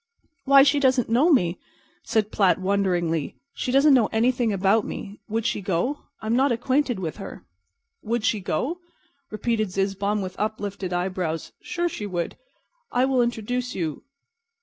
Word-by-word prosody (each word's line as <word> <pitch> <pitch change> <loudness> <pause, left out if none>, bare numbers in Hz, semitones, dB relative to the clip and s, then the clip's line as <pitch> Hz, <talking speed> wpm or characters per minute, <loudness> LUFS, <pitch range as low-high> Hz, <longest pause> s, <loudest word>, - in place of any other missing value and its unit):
"Why, 275 0 +8
she 285 +1 +3
doesn't 260 -4 +2
know 280 +9 +4
me," 180 - +2 0.4
said 215 -1 0
Platt, 190 -3 +3
wonderingly. 180 -5 0 0.2
"She 250 - -3
doesn't 275 +2 +5
know 240 -5 +5
anything 240 0 +1
about 200 +2 +2
me. 200 +1 -7
Would 225 +1 -1
she 235 -3 0
go? 195 - -1 0.2
I'm 220 +2 0
not 265 +2 +3
acquainted 255 +1 +1
with 165 -5 -4
her." - - -9 0.6
"Would 230 0 -2
she 240 -4 +2
go?" 250 - -2 0.5
repeated 215 -1 -1
Zizzbaum, 195 +2 -1
with 185 -1 -6
uplifted 205 -3 -3
eyebrows. 180 -2 -2
"Sure, 350 -1 -2
she 210 -11 -5
would 175 -3 -2
go. - - -19 0.5
I 250 +1 +3
will 265 -2 +2
introduce 240 +1 -2
you. 160 -5 -3
215 Hz, 155 wpm, -24 LUFS, 190-250 Hz, 0.6 s, Why